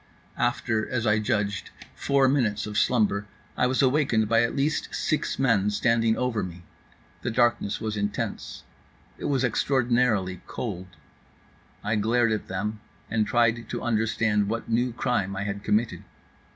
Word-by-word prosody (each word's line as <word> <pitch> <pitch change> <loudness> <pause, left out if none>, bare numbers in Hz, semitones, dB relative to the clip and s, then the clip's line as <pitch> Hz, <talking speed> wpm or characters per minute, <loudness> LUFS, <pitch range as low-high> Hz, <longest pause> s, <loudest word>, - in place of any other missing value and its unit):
After 115 -2 0
(as 120 -2 -1
I 105 -1 +3
judged) 105 -3 -1 0.2
four 140 -1 +2
minutes 115 -6 +1
of 105 -1 -6
slumber, 105 -3 +2 0.3
I 125 - +2
was 130 +2 +1
awakened 130 -5 +2
by 115 +1 +4
at 115 - 0
least 145 +3 0
six 155 - -1
men 115 -7 +2
standing 115 +2 +2
over 125 -4 0
me. 85 -1 -7 0.6
The 120 - -2
darkness 120 -3 +1
was 110 -1 -3
intense, 105 0 -3 0.6
it - - -5
was 135 -2 +1
extraordinarily 120 -7 +1
cold. 95 -6 -5 1.0
I 110 +1 0
glared 115 +2 +2
at 110 - -2
them 105 +3 -3 0.3
and 110 -1 +1
tried 115 -2 +1
to - - -4
understand 110 -2 +1
what 115 +1 -3
new 120 +2 +1
crime 115 -6 -1
I 100 - -2
had 100 0 -4
committed. 110 +3 0
110 Hz, 150 wpm, -26 LUFS, 105-120 Hz, 1.0 s, by